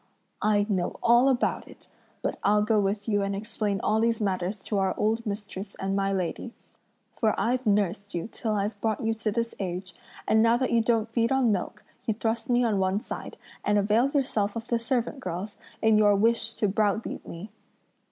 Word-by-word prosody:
I 205 -1 +3
know 185 -5 -1
all 240 +3 +5
about 255 -2 0
it; - - -15 0.4
but - - -2
I'll 210 +1 +4
go 215 0 +2
with 205 +1 -1
you 205 -2 +2
and 195 0 -1
explain 210 -1 -2
all 215 +1 +2
these 230 0 +1
matters 190 -1 -2
to 205 - -1
our 190 -1 +1
old 225 +2 0
mistress 200 -1 -5
and 195 0 -2
my 195 0 +1
lady; 190 +5 -3 0.6
for 220 -2 0
I've 250 +1 0
nursed 200 -1 0
you 170 - -2
till 220 -1 -2
I've 205 0 -2
brought 220 -2 0
you 225 - +2
to 225 -1 -2
this 230 +2 -2
age, 185 -1 -4 0.3
and 220 - +4
now 230 +1 +4
that 260 +1 -1
you 235 - +4
don't 225 -1 +1
feed 230 0 +2
on 265 -4 +3
milk, 190 -3 -3 0.2
you 220 - +1
thrust 225 +3 -2
me 245 0 +3
on 215 -4 +1
one 190 +1 +1
side, - - -7 0.3
and 210 - +2
avail 215 +6 +3
yourself 235 -8 0
of 230 0 -6
the 235 - +2
servant 245 +3 -1
girls, 185 0 -5 0.3
in 220 -1 +5
your 205 -1 +5
wish 230 +2 +2
to 210 - +1
browbeat 210 +2 -1
me." 185 +5 -8
215 Hz, 200 wpm, -27 LUFS, 200-230 Hz, 0.6 s, all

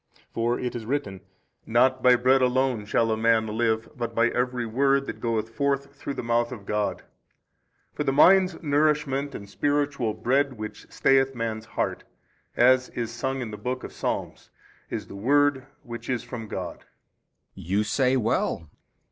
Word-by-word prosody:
For 120 +1 0
it 125 -1 -3
is 115 -2 -6
written, 125 -9 -2 0.5
Not 130 +3 +3
by 125 0 +6
bread 130 +2 +3
alone 125 -4 +1
shall 115 +1 +2
a - - +2
man 110 0 +3
live 110 +1 0
but 120 -3 -4
by 115 +1 +3
every 125 0 -1
word 135 +4 +2
that - - -6
goeth 115 -2 -1
forth 140 +3 -1
through 140 0 -5
the - - -4
mouth 120 +1 +1
of 105 -6 -8
God. 105 0 -1 0.9
For - - -2
the 135 - +1
mind's 185 +5 +5
nourishment 145 -2 +1
and 100 - -8
spiritual 140 -1 0
bread 135 +2 +1
which 110 -2 -8
stayeth 135 0 +3
man's 115 -2 -3
heart, - - -1 0.5
as 130 +1 +4
is 115 -1 -4
sung 130 +3 -3
in 115 -3 -5
the 105 - -6
book 130 +3 -4
of - - -8
Psalms, - - -4 0.4
is - - -4
the - - -11
word 135 +4 +2 0.2
which 120 +1 -8
is 125 -2 -1
from 120 -2 -7
God. 95 -3 -5 0.7
B. - - -11
You 100 +5 0
say 125 +4 +2
well. 100 - -1
125 Hz, 170 wpm, -26 LUFS, 115-135 Hz, 0.9 s, by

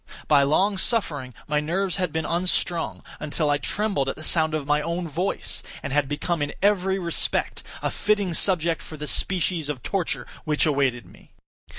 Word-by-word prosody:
By 145 -2 +6
long 190 +8 +2
suffering 150 - 0
my 150 0 +1
nerves 180 +5 0
had 180 -1 -1
been 160 -1 -2
unstrung, 170 - 0 0.2
until 150 0 0
I 145 - +2
trembled 195 -11 0
at - - -3
the 155 - -9
sound 160 -1 +3
of 150 -3 -3
my 150 +1 +2
own 170 +2 -2
voice, 175 +6 0 0.2
and - - -4
had 145 -2 +2
become 150 +3 -1
in 145 - -1
every 190 -1 +2
respect 170 -3 -1 0.2
a - - 0
fitting 205 -4 +1
subject 170 -2 +2
for 155 - -9
the 150 - -5
species 170 -2 0
of 130 -5 -4
torture 190 -4 -1 0.2
which 150 0 +2
awaited 135 - +1
me. - - -19
160 Hz, 180 wpm, -24 LUFS, 145-185 Hz, 0.2 s, By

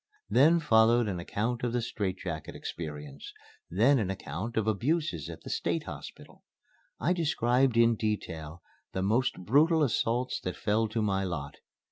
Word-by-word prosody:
Then 160 +6 +5
followed 115 -4 +4
an 95 -4 -2
account 115 +7 -2
of 120 -1 -1
the 120 - +1
strait 100 -5 -2
jacket 80 -4 -6
experience; 75 -3 -7 0.4
then 120 +10 +4
an 100 -4 -1
account 95 +4 -5
of 110 - +2
abuses 110 - 0
at - - -9
the - - -8
State - - -1
Hospital. - - -10 0.6
I 175 - +2
described 130 -7 +2
in 115 0 +5
detail 85 -7 -4 0.3
the 95 - -1
most 115 +6 +1
brutal 155 - +4
assault 125 0 0
that 90 -1 -3
fell 110 +4 +1
to 110 +1 -2
my 95 -2 +1
lot. 75 -6 -4
110 Hz, 155 wpm, -29 LUFS, 90-125 Hz, 0.6 s, Then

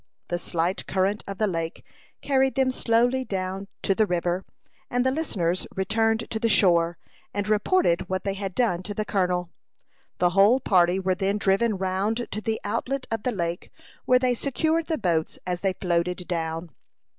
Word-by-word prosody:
The 175 - -1
slight 175 +1 -1
current 195 +2 0
of 195 -1 -5
the 215 - +2
lake 165 -4 -3 0.4
carried 265 -1 +2
them 265 -1 +2
slowly 245 +2 +2
down 195 -3 -4 0.2
to 195 - +3
the 215 +2 +2
river, 175 +1 -1 0.5
and 245 +1 +1
the 260 - +3
listeners 185 - -1
returned 225 +3 +1
to 220 - -1
the 230 - +1
shore, 175 -5 +4 0.4
and 205 0 -1
reported 210 - +2
what 185 0 -1
they 195 - -1
had 195 -2 -5
done 215 -8 +1
to 205 +2 -5
the 215 - -2
colonel. 180 -4 0 0.7
The 175 -1 +3
whole 200 +7 +5
party 185 -5 +3
were 190 0 +1
then 195 +2 0
driven 200 +2 +2
round 195 +5 -1
to 215 - -3
the 220 0 -1
outlet 255 +6 -2
of 225 -2 -1
the 250 - 0
lake, 170 -4 -3 0.4
where 250 - +5
they 250 -1 +2
secured 315 +6 0
the 320 - 0
boats 170 -6 0
as 180 -1 -2
they 195 -1 +1
floated 180 0 -1
down. 165 -1 -3
195 Hz, 180 wpm, -25 LUFS, 180-230 Hz, 0.7 s, whole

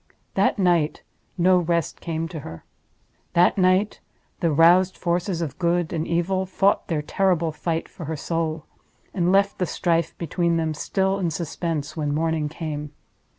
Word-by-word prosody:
That - - +2
night 175 -5 +1 0.3
no 180 +1 +4
rest 170 -1 -1
came 165 -1 -3
to 160 - -6
her. 80 - -10 0.7
That 175 +1 +4
night 185 +2 +2 0.4
the 170 -3 +1
roused 175 +5 +5
forces 175 0 -1
of 145 -1 -6
Good 175 -1 +1
and 160 -1 -2
Evil 185 +3 0
fought 195 +1 +1
their 155 -3 -1
terrible 175 -1 +1
fight 165 +1 -3
for 170 - -9
her 160 +2 -3
soul—and 165 +3 -3
left 200 +1 +2
the 180 - 0
strife 165 -2 0
between 170 +1 0
them 160 -1 0
still 190 +5 0
in 175 -3 0
suspense 160 -2 -3
when 145 -2 -1
morning 160 -1 0
came. 150 -2 -5
170 Hz, 150 wpm, -24 LUFS, 160-180 Hz, 0.7 s, roused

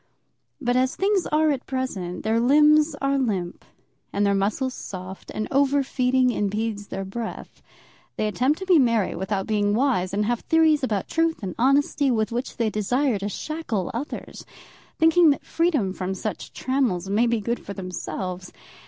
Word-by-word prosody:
But 245 -3 0
as 255 +1 +2
things 390 -1 +1
are 310 0 +2
at 275 -2 -4
present, 200 -10 -3
their 220 +1 +1
limbs 300 +4 +5
are 275 0 +2
limp 195 -9 -2 0.5
and 205 +1 +1
their 200 - +3
muscles 215 +7 0
soft, 185 -3 -8
and 215 - -3
over 280 +1 +3
feeding 255 -1 +2
impedes 210 -1 -2
their 195 0 -5
breath. 220 +4 -7 0.5
They 215 - -1
attempt 255 +8 +1
to 380 - -6
be 365 -4 +5
merry 230 -6 +2
without 190 +2 -2
being 205 -1 +1
wise, 225 -8 +1
and 205 +2 0
have 240 +1 0
theories 320 -3 +3
about 210 -7 -1
truth 330 -6 0
and 185 -2 -3
honesty 275 +2 +3
with 220 -3 0
which 245 +3 -4
they 230 -2 0
desire 240 +3 0
to 200 +1 -3
shackle 240 - -3
others, 260 +7 -6 0.5
thinking 325 +1 +5
that 285 - 0
freedom 295 - +1
from 190 0 -3
such 210 +3 -5
trammels 250 -9 -1
may 215 +5 +2
be 235 -1 +1
good 235 +3 -3
for 200 - -7
themselves. 185 -1 -5
235 Hz, 170 wpm, -24 LUFS, 200-280 Hz, 0.5 s, limbs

